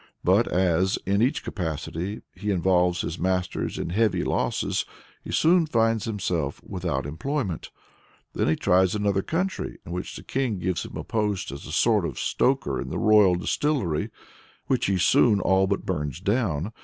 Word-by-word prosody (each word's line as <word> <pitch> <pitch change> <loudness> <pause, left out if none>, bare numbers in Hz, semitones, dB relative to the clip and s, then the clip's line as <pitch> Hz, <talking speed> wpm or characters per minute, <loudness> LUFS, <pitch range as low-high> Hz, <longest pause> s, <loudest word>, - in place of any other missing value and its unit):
But - - +4
as, 90 +1 +2
in 100 +2 +1
each 130 +6 +1
capacity, 90 +3 -4
he 100 +3 -5
involves 90 -2 +2
his 85 - -4
masters 90 0 -1
in 85 - -3
heavy 110 +3 +2
losses, - - 0 0.4
he - - -7
soon 170 0 +4
finds 115 -5 +1
himself 90 -9 -2
without 85 -8 -3
employment. 95 - -3 0.6
Then - - 0
he 80 - +3
tries 95 +2 +3
another 100 -2 +1
country, 185 - -2
in 85 - -8
which 90 +1 -5
the - - -9
king 130 -6 -1
gives 90 0 -2
him - - -8
a - - -4
post 105 - -1
as 70 - -8
a - - -7
sort 105 +4 +3
of 80 -7 -4
stoker 130 -1 0
in - - -6
the - - -3
royal 105 -4 +5
distillery, 90 - -1 0.6
which - - +1
he 95 -1 +1
soon 105 +3 +4
all 95 +1 +3
but 100 +1 -1
burns 80 -5 -3
down. 100 - -1
95 Hz, 170 wpm, -25 LUFS, 85-110 Hz, 0.6 s, royal